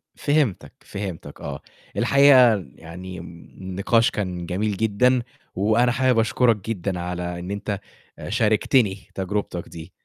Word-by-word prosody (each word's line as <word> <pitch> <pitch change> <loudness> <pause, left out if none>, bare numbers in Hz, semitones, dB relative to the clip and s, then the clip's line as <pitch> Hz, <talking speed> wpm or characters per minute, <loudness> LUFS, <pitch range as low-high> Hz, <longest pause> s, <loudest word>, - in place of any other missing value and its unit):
فهمتك، 145 - 0
فهمتك 100 -4 -7
آه، 70 -1 -6 0.4
الحقيقة 130 -7 +5
يعني 90 +3 -9
النقاش 95 +6 -1
كان 90 -4 -3
جميل 100 +3 -2
جدًا، 110 +4 +2 0.3
وأنا 110 +5 +3
حابب 130 -2 +2
أشكرك 115 +1 +3
جدًا 95 -3 -2
على 90 0 -4
إن 90 +3 -6
أنت 100 0 -3 0.5
شاركتني 110 -2 +2
تجربتك 95 -2 -3
دي. 80 -1 -10
100 Hz, 115 wpm, -23 LUFS, 90-115 Hz, 0.5 s, الحقيقة